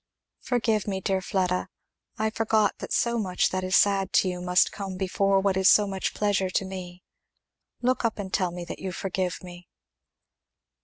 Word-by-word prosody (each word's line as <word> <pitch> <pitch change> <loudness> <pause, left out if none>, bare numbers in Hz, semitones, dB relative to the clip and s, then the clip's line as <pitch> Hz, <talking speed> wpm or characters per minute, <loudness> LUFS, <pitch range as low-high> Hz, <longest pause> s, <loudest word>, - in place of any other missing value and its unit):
"Forgive 225 -4 0
me, 195 -2 -1
dear 190 0 -1
Fleda! 185 -1 -1 0.5
I 220 0 0
forgot 220 -1 +1
that - - -7
so 235 0 +1
much 185 -4 +1
that 185 0 -2
is 185 +1 +1
sad 195 -2 +3
to - - +4
you 180 0 -5
must 180 +1 +3
come 195 -2 -6
before 195 +1 +1
what 195 -1 +1
is 190 0 +5
so 210 - +6
much 195 -1 -3
pleasure 200 -2 +1
to 190 - -1
me. 180 -1 -8 0.8
Look 255 +1 +1
up 230 -1 0
and 195 -3 -6
tell 185 -2 +1
me 175 0 -7
that - - -7
you 190 - -4
forgive 185 -1 -3
me." 175 -1 -11
190 Hz, 185 wpm, -26 LUFS, 185-205 Hz, 0.8 s, so